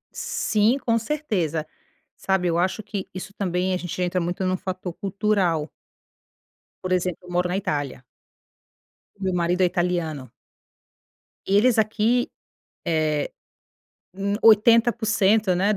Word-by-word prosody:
Sim, 215 +4 +1
com 230 -4 +1
certeza. 205 - -2 0.5
Sabe, 190 -2 0
eu 170 -1 +1
acho 185 +4 0
que 200 -2 -5
isso 190 +1 -7
também, 185 -1 -1
a - - +1
gente 180 0 -6
entra 180 0 0
muito 175 +2 -2
num 185 0 +1
fator 185 -1 -5
cultural. 195 -5 0 1.2
Por 185 - -3
exemplo, 180 0 -1
eu 180 - -10
moro 180 0 +1
na 180 - -2
Itália. 145 -9 -2 1.2
O - - -7
meu 190 -1 0
marido 175 +1 +1
é - - +6
italiano. 175 -7 -1 1.2
Eles 215 +5 +4
aqui, 220 +3 +2 0.6
eh, 155 -3 0 0.8
n 200 +2 -2
80%, 220 -2 +4
né, 195 +4 +2
185 Hz, 125 wpm, -24 LUFS, 175-210 Hz, 1.2 s, é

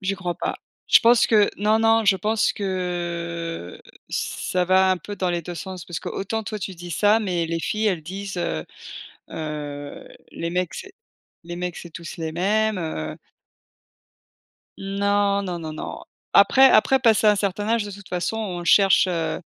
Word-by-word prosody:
J'y 195 0 -1
crois 180 -2 -4
pas. - - -3 0.3
Je - - +7
pense 235 0 +5
que 210 -2 +4
non, 215 +2 +2
non, 225 0 +3
je 200 -2 +4
pense 215 +3 +1
que, 170 - -4 0.3
ç - - -3
ça 180 -1 +2
va 190 +1 +4
un 185 - +2
peu 205 +3 -8
dans 185 -2 -1
les 175 -1 -2
2 175 +2 -7
sens. 185 0 -7
Parce 175 - -6
que - - -5
autant 220 +3 -3
toi 215 +1 -5
tu 190 -2 -5
dis 175 +1 -9
ça, 210 +6 +3
mais 175 -5 -1
les 165 0 -2
filles, 215 +5 -1
elles 180 -6 0
disent, 195 +3 -6
heu, 170 - -2 0.7
heu: 145 -2 -6 0.2
«Les 170 - -4
mecs, 180 0 -2
c'est 390 - -8 0.5
les 175 +1 -7
mecs 180 0 -4
c'est 170 - -9
tous 170 +1 -8
les 160 -1 -3
mêmes, 210 +4 +1
heu» 155 - -4 1.6
Non, 200 0 +1
non, 180 -3 -4
non, 160 -2 -6
non. 155 - -7 0.3
Après 265 0 +7
après, 265 +5 +4
passer 225 -3 +4
un 210 - +6
certain 205 +1 -2
âge, 230 -2 +1
de 205 - -7
toute 200 -1 -11
façon 180 +4 -2
on 190 -6 -4
cherche, 195 +1 +5
heu 165 -3 -2
185 Hz, 185 wpm, -23 LUFS, 170-210 Hz, 1.6 s, Je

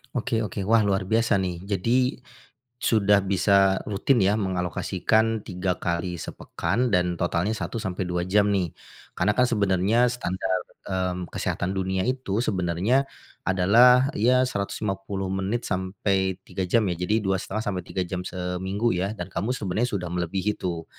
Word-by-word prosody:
Oke 115 -2 0
oke, 100 0 -5
wah, 115 -2 +5
luar 95 -1 0
biasa 110 -3 +2
nih 90 -2 -2
jadi, 120 +7 +1 0.6
sudah 105 -4 +3
bisa 95 0 +3
rutin 115 +5 +2
ya 100 +3 +3
mengalokasikan 100 +4 0
3 90 -1 -2
kali 85 -1 -2
sepekan 125 -2 -2
dan 90 -1 +2
totalnya 85 +3 0
1-2 90 -6 -3
jam 105 +1 +4
nih. 90 -3 0 0.5
Karena 95 +4 +2
kan 125 +1 +3
sebenarnya 105 +2 +2
standar, 95 -6 -2 0.3
mmm, 90 -1 -2
kesehatan 95 +2 -2
dunia 95 0 -1
itu 125 -3 -1
sebenarnya, 95 +9 +1 0.3
adalah 120 - +5
ya 125 +2 +3
150 100 -3 -3
menit 95 +5 -2
sampai 95 0 -1
3 95 - -5
jam 110 +2 +3
ya, 90 - 0
jadi 90 +6 0
2,5-3 95 -1 -2
jam 90 +1 -4
seminggu 95 +4 -2
ya, 100 +4 -2
dan - - -4
kamu 110 - -2
sebenarnya 105 +5 -1
sudah 95 -5 -3
melebihi 95 +4 -1
tuh. 85 -3 -3
95 Hz, 135 wpm, -25 LUFS, 90-110 Hz, 0.6 s, wah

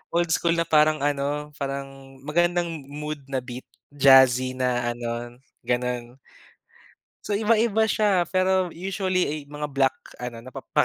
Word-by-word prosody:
old 170 0 +2
school 170 +1 +2
na 170 - +1
parang 155 -1 +3
ano, 145 +1 -1
parang 135 -1 -6
magandang 170 0 0
mood 150 +1 -5
na 135 -1 -1
beat, 125 +1 -9 0.2
jazzy 130 -2 +5
na 125 -2 0
ano, 120 0 -5 0.3
gano'n. 125 0 -2 1.1
So 210 - -3
iba-iba 220 +1 +2
siya, 200 -5 +2
pero 185 -1 +2
usually 185 +1 -1
ey 150 +1 -3
mga 150 0 -6
black 135 -1 +2 0.2
ano 120 -2 -6
napapaka 130 - -1
145 Hz, 135 wpm, -24 LUFS, 130-175 Hz, 1.1 s, jazzy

